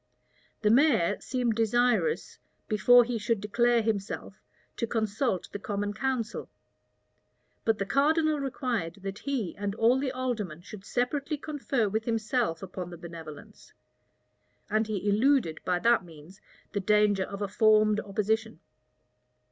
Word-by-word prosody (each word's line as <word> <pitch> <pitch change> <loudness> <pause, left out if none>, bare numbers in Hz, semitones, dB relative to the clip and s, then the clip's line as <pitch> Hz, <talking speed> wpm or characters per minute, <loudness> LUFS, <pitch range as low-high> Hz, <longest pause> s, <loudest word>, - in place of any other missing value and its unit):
The 210 - +4
mayor 240 - +4
seemed 250 -3 -1
desirous, 240 - +1 0.3
before 245 +3 +6
he 235 -1 -3
should 225 0 0
declare 235 +3 +2
himself, 210 -2 -3 0.4
to 230 - -1
consult 220 -2 -1
the 205 - -5
common 205 0 -3
council; 235 -1 -3 1.2
but 225 -1 +2
the 200 - -2
cardinal 305 +5 +2
required 245 - -2
that 195 +1 -5
he 260 -10 -3
and 200 0 -3
all 235 +4 +3
the 265 -1 -1
aldermen 230 - -3
should 205 0 -11
separately 280 +6 -1
confer 275 -6 -1
with 220 +2 -2
himself 225 -6 -1
about 180 -1 -6
the 175 - -9
benevolence; 165 -3 -11 1.0
and 215 +1 +1
he 210 -2 -3
eluded 215 - +2
by 180 -1 +1
that 230 +3 +3
means 165 +2 -15 0.3
the 205 - -1
danger 205 -1 +3
of 200 +1 -5
a - - -1
formed 215 +1 +4
opposition. 220 +2 -1
220 Hz, 135 wpm, -28 LUFS, 200-245 Hz, 1.2 s, before